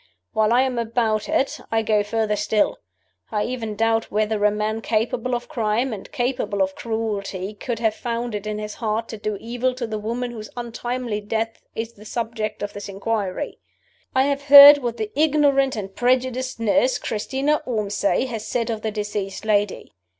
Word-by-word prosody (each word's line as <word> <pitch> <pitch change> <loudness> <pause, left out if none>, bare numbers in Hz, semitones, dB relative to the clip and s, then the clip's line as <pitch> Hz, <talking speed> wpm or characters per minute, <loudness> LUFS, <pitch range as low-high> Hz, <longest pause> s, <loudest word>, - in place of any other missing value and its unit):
While 220 -1 +2
I 250 +2 +5
am 255 -2 -1
about 225 -1 0
it, 310 -3 0
I 225 0 +2
go 215 -1 +2
further 210 0 0
still. 210 0 +1 0.5
I 210 -1 0
even 230 -4 -4
doubt 225 +1 +1
whether 215 0 0
a 210 - +6
man 215 +1 -2
capable 230 +3 0
of 240 - -5
crime 230 +2 0
and 200 - -9
capable 245 -7 0
of 190 0 -2
cruelty 210 -4 -3
could 230 +3 -4
have 220 -1 +1
found 235 0 -3
it 210 0 -4
in 210 0 -2
his 210 0 -5
heart 225 0 -2
to 220 - -6
do 210 0 -3
evil 245 +2 -1
to 250 -2 -3
the 220 -1 -4
woman 240 +3 -3
whose 215 -2 -8
untimely 240 -2 -3
death 225 +2 -3
is 225 +1 -4
the 210 0 -15
subject 220 -2 -3
of 205 - -4
this 205 0 -7
inquiry. 200 -1 -3 0.6
"I 260 - +5
have 280 0 -1
heard 285 +1 +11
what 240 -3 -3
the 425 -1 -3
ignorant 285 -3 +3
and 195 -3 -6
prejudiced 255 0 0
nurse, 250 +3 +2
Christina 270 +7 -1
Ormsay, 210 0 0
has 230 -4 -5
said 235 0 -1
of 220 -1 -4
the 220 - -1
deceased 205 -1 -4
lady. 205 - 0
225 Hz, 180 wpm, -23 LUFS, 210-245 Hz, 0.6 s, heard